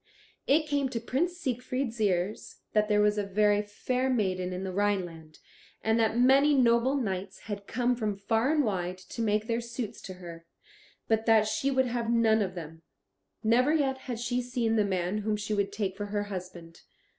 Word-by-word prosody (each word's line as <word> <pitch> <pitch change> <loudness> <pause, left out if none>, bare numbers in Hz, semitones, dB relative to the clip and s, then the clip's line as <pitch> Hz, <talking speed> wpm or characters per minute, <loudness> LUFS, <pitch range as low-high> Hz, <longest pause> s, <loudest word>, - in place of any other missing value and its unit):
It 305 +3 +4
came 285 -3 0
to 235 - -3
Prince 320 +10 -1
Siegfried's 250 -5 -3
ears 190 0 -1
that 210 0 +2
there 210 0 +4
was 210 0 +3
a - - 0
very 205 +1 +2
fair 250 +5 -2
maiden 185 -7 0
in 180 +1 -4
the 190 - -3
Rhineland, 180 -6 -2 0.5
and 220 +1 +2
that 220 0 +2
many 275 +4 +5
noble 245 +1 +3
knights 195 -6 -3
had 200 -1 -6
come 245 +1 +1
from 215 -4 -2
far 225 +6 +1
and 305 -2 +3
wide 185 -5 -2
to 185 +5 -7
make 210 -1 +1
their 230 0 -1
suits 235 -1 -6
to 185 - -8
her, 170 -2 -10 0.6
but 220 0 +1
that 220 -1 +5
she 275 +4 0
would 260 -1 +2
have 240 -1 -2
none 225 -2 +3
of 190 -2 -2
them. 160 -1 -8 0.6
Never 245 +6 +4
yet 275 -4 +1
had 240 -2 -3
she 245 +1 -1
seen 240 -2 -1
the 215 - +3
man 190 0 -1
whom 210 0 -1
she 210 +1 -3
would 200 -1 0
take 200 -2 -2
for 205 +1 -5
her 205 0 -1
husband. 180 -4 -8
215 Hz, 190 wpm, -29 LUFS, 195-245 Hz, 0.6 s, many